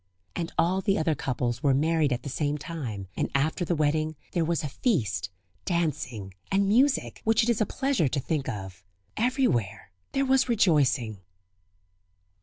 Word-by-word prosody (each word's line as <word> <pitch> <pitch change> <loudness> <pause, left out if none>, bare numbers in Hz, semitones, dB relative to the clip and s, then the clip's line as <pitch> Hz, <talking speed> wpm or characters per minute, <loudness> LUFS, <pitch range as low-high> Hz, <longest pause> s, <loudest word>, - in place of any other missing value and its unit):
And 170 -1 -3
all 185 +3 +2
the 195 -1 +1
other 160 0 +1
couples 125 -3 -2
were 140 -2 +3
married 155 0 +2
at 125 - -1
the - - -6
same 145 +2 -1
time, 130 - -5
and - - -1
after 155 +6 +1
the 175 0 0
wedding 155 +1 +1 0.2
there 170 - +1
was 165 0 0
a - - -1
feast, 110 - 0 0.3
dancing, 135 - -2 0.2
and 195 0 +3
music, 260 +7 +2
which 225 +1 +3
it 235 - 0
is 235 -2 +2
a 215 - +2
pleasure 270 - +1
to 140 +2 -1
think 140 0 -2
of. 95 -5 -7 0.3
Everywhere 170 - 0 0.2
there 275 0 +2
was 265 -1 +3
rejoicing. 140 - +2
155 Hz, 165 wpm, -27 LUFS, 125-195 Hz, 0.3 s, were